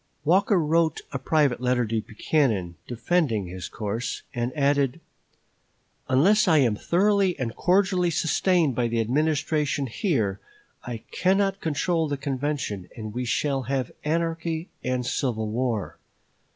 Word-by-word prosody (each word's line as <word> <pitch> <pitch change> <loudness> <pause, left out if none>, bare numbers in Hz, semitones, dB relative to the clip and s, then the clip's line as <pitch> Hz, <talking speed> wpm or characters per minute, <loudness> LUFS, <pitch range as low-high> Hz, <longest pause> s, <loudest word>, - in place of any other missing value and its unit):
Walker 190 +5 +4
wrote 160 +1 +1
a 135 - -3
private 140 -3 +1
letter 125 -1 +1
to 110 0 -1
Buchanan, 110 - 0
defending 125 - 0
his 90 0 -6
course, 110 +3 -4
and 120 -1 -2
adding: 140 0 +2 1.1
"Unless 195 - +4
I 160 -3 +5
am 120 -7 +3
thoroughly 195 - +2
and 125 -5 -3
cordially 180 -1 +2
sustained 170 -1 +2
by 120 0 0
the 115 0 -1
Administration 150 +3 0
here, 115 - -1 0.4
I 120 -2 -6
cannot 195 +1 +1
control 165 +1 0
the 145 -1 -2
convention, 135 -9 -3
and 110 -2 -6
we 125 +2 -3
shall 135 +3 0
have 135 -3 -1
anarchy 165 +1 -1
and 125 -1 -1
civil 115 -4 -1
war. 115 -2 -2
140 Hz, 130 wpm, -25 LUFS, 120-165 Hz, 1.1 s, I